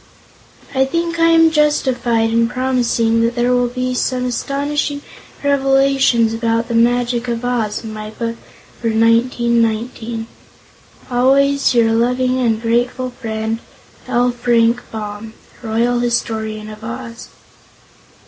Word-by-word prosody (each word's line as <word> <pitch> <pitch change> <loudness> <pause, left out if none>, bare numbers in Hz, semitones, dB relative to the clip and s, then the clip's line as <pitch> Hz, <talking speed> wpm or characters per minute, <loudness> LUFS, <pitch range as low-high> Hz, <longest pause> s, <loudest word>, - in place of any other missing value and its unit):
I 265 -1 +3
think 335 +4 -2
I 330 - +5
am 325 -1 +5
justified 250 -7 +1
in 230 0 +2
promising 245 -3 +1
that 230 +1 0
there 240 0 +1
will 245 0 +2
be 255 +1 -3
some 250 0 -1
astonishing 285 +3 -2 0.4
revelations 270 -4 +3
about 230 +1 -1
The - - -2
Magic 240 +1 +1
of 235 0 -3
Oz 230 -4 -1
in 220 -1 -7
my 215 0 -7
book 230 +1 -4 0.5
for 235 - -1
1919. 230 0 +1 0.9
Always 275 +2 +3
your 230 -1 +4
loving 250 +2 +1
and 230 -3 +1
grateful 245 +2 -1
friend, 220 -2 -4 0.5
L. 245 +1 +2
FRANK 240 0 +2
BAUM. 215 0 -7 0.3
Royal 235 +1 0
Historian 220 -3 -2
of 215 0 -10
Oz. 235 0 -7
240 Hz, 120 wpm, -17 LUFS, 230-255 Hz, 0.9 s, I